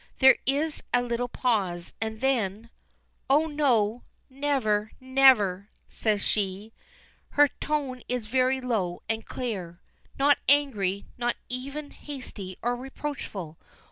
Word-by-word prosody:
There 265 0 +7
is 295 +3 +1
a 245 0 +3
little 240 0 -1
pause, 195 -9 -1
and 220 0 -3
then: 230 -4 0 0.6
"Oh, 295 +4 +5
no! 245 -7 +2 0.3
Never 260 -7 0
never!" 255 -8 +4 0.2
says 210 -3 0
she. 205 +1 -1 0.6
Her 290 0 +5
tone 280 -4 -2
is 250 -3 -1
very 260 +3 +2
low 200 -9 -1
and 225 0 -2
clear 185 -9 -4 0.4
not 285 +1 +4
angry, 210 -10 +2
not 240 0 +1
even 275 +4 -5
hasty 230 -10 -8
or 240 +1 +1
reproachful. 245 - -6
245 Hz, 115 wpm, -27 LUFS, 210-270 Hz, 0.6 s, There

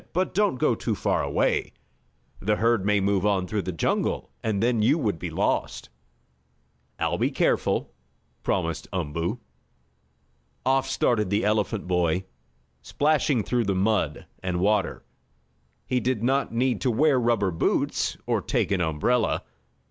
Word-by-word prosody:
But 185 +2 0
don't 205 -6 +2
go 125 - +2
too - - -2
far - - 0
away. - - 0 0.7
The 105 +2 +1
herd 115 -2 +2
may 105 -1 +3
move 100 -1 +1
on 100 -3 +2
through 105 +3 -2
the 95 - -4
jungle, 85 - -1
and 110 -3 -1
then 120 -2 +2
you 115 +9 +4
would 105 - -1
be - - -4
lost." - - -1 1.1
"I'll - - -1
be - - +2
careful," - - 0 0.5
promised - - -1
Umboo. 85 +9 -2 1.3
Off 135 0 +2
started 105 -5 +1
the 100 +2 +1
elephant 105 0 0
boy, 90 0 +1 0.6
splashing 145 - +1
through 120 +2 0
the 100 -1 0
mud 95 -6 0 0.2
and 90 -1 -2
water. 100 0 +1 0.8
He 125 - 0
did 125 -3 -1
not 135 +3 +1
need 120 0 0
to 130 - +1
wear 135 +3 +3
rubber 115 -5 +1
boots, 80 - 0
or - - 0
take - - -1
an 95 -2 +1
umbrella. 85 +10 +1
105 Hz, 145 wpm, -25 LUFS, 95-125 Hz, 1.3 s, you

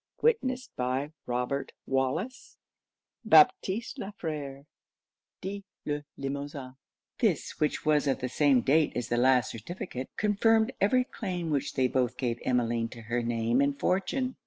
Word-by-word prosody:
Witnessed 260 - +1
by 130 +4 -1 0.2
ROBERT 125 +3 -2
WALLACE, 135 - -2 0.7
BAPTISTE 205 - +4
LA 195 - -4
FERE, 145 -6 -5 0.8
(dit 200 +2 -5 0.2
Le 145 0 -2
Limosin.)' 140 -1 -5 0.4
This, - - 0
which 150 +1 0
was 150 -1 +3
of 135 - +2
the 125 - -2
same 135 -1 +3
date 150 +5 +3
as 120 -2 -3
the 120 - +1
last 125 0 +4
certificate, 130 - -6
confirmed 220 +2 +3
every 250 +6 +4
claim 180 -9 -4
which 140 -3 -1
they 130 -1 +3
both 125 -1 0
gave 120 -2 -1
Emmeline 120 -2 0
to 115 - -10
her 120 +2 -1
name 115 +2 +1
and 140 0 +1
fortune. 255 +8 0
140 Hz, 140 wpm, -29 LUFS, 125-190 Hz, 0.8 s, BAPTISTE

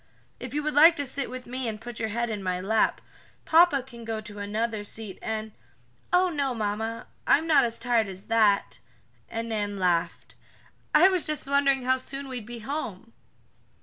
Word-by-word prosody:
"If 255 +2 -7
you 300 - 0
would 305 0 -1
like 320 +4 +7
to 285 - -2
sit 275 +1 -2
with 255 0 -7
me 255 0 -4
and 215 -1 -4
put 235 0 -8
your 220 - -1
head 235 +2 -2
in 210 -2 -4
my 185 -1 -2
lap, 215 +4 +1 0.4
papa 320 -5 +5
can 240 -3 -12
go 225 -1 -3
to 210 -1 -9
another 215 +1 -2
seat 205 -1 -6
and 220 0 -4 0.3
" 120 0 -37
"Oh, 360 +1 +4
no, 280 -6 -1
mamma, 220 +1 -3 0.2
I'm 315 - +4
not 305 -6 +5
as 230 0 -3
tired 235 -3 +1
as 190 0 -9
that," 215 -3 +2 0.5
and 230 0 -4
Nan 205 -2 -2
laughed. 175 -3 0 0.6
"I 330 +5 +8
was 370 -3 0
just 305 -2 0
wondering 275 -1 +2
how 260 +1 +2
soon 275 +2 -5
we'd 245 -5 -6
be 240 0 -7
home." 230 -4 -5
230 Hz, 190 wpm, -27 LUFS, 215-275 Hz, 0.6 s, I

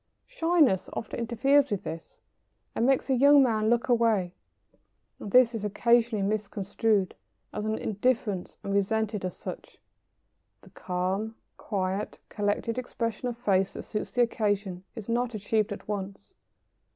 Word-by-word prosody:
] - - -49
Shyness 330 - +2
often 220 - -5
interferes 270 +5 +3
with 205 -4 -2
this 165 +1 -7 0.6
and 235 - +1
makes 270 -1 +2
a 270 - +2
young 280 +2 +7
man 220 -3 +1
look 235 0 +2
away, 225 -7 +2 0.9
and - - -6
this 250 +2 +5
is 220 -3 -4
occasionally 230 0 +2
misconstrued 205 -1 0 0.4
as 210 - -3
indifference 215 -2 -1
and 200 - -3
resented 210 +1 0
as 185 - -4
such. - - -8 0.8
The - - -18
calm, 190 +5 -2 0.2
quiet, 195 0 -3
collected 210 +3 -1
expression 230 -1 -3
of 240 -1 -4
face 195 -5 +1
that - - -7
suits 210 - -5
the 245 - +4
occasion 205 -5 -1
is 220 -4 -7
not 240 0 -1
achieved 215 +1 0
at 200 - -7
once. 200 - -5
215 Hz, 140 wpm, -28 LUFS, 200-240 Hz, 0.9 s, young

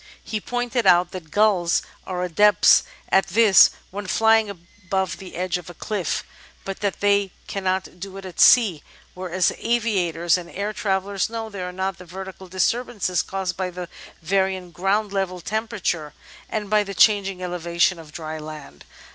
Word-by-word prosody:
He 215 -1 -4
pointed 245 +1 -1
out 175 +1 +5
that 175 -4 -8
gulls 195 -3 +2 0.2
are 180 -1 -2
adepts 200 +2 +5 0.3
at 190 - +3
this 205 +1 +7 0.2
when 205 +1 -6
flying 220 +1 +3
above 190 +1 -4
the 190 - -10
edge 180 0 -1
of 175 - -12
a 175 - -10
cliff, 200 -4 -2 0.4
but 195 0 -5
that 200 -1 -2
they 200 -1 +3 0.2
cannot 190 -2 -3
do 195 +1 -7
it 195 - -9
at 185 - -9
sea, 200 - +6 0.3
where, 185 -1 -7
as 185 0 +2
aviators 190 -8 +1
and 170 -1 -10
air 205 +4 -3
travellers 195 -1 -1
know, 225 -1 -5
there 185 -3 -5
are - - -7
not 190 0 -3
the 180 - -11
vertical 190 +1 -9
disturbances 190 0 0
caused 190 -1 -3
by 185 -1 -2
the 180 -1 -7 0.3
varying 190 0 0
ground 195 +4 0
level 190 -2 -2
temperature 190 -7 -3 0.3
and 215 -2 -3
by 210 +1 +3
the 200 -1 -7
changing 195 -3 +3
elevation 175 0 0
of 155 -2 -12
dry 155 0 -6
land. 150 - -10
190 Hz, 165 wpm, -23 LUFS, 180-205 Hz, 0.4 s, this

